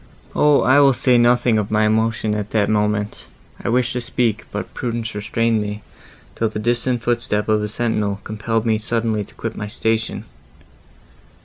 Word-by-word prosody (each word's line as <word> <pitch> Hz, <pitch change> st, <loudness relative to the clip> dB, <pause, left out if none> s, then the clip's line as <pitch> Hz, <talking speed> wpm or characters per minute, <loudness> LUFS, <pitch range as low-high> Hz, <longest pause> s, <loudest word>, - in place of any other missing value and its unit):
O! 150 Hz, -1 st, +4 dB
I 130 Hz, +2 st, +5 dB
will 140 Hz, -1 st, +6 dB
say 125 Hz, -1 st, +3 dB
nothing 120 Hz, -1 st, +3 dB
of 105 Hz, -, -3 dB
my 110 Hz, 0 st, +2 dB
emotion 110 Hz, 0 st, +1 dB
at 105 Hz, -1 st, -3 dB
that 105 Hz, -2 st, +1 dB
moment; 105 Hz, -1 st, -1 dB, 0.4 s
I -, -, -1 dB
wished 125 Hz, +1 st, +1 dB
to 125 Hz, -, -2 dB
speak, 120 Hz, -3 st, -1 dB
but 100 Hz, -2 st, -5 dB
prudence 115 Hz, -2 st, -3 dB
restrained 110 Hz, +2 st, 0 dB
me, 105 Hz, 0 st, -5 dB, 0.5 s
till 115 Hz, -, -1 dB
the 105 Hz, -, -6 dB
distant 120 Hz, +2 st, 0 dB
foot 120 Hz, -1 st, +1 dB
step 105 Hz, -2 st, -1 dB
of 110 Hz, -1 st, +2 dB
a 105 Hz, -, -3 dB
sentinel 105 Hz, -3 st, -1 dB
compelled 110 Hz, +1 st, -2 dB
me 110 Hz, -1 st, +2 dB
suddenly 110 Hz, -1 st, -1 dB
to -, -, -17 dB
quit 115 Hz, -1 st, -5 dB
my 105 Hz, -, -5 dB
station. 110 Hz, +1 st, -2 dB
110 Hz, 180 wpm, -20 LUFS, 105-120 Hz, 0.5 s, will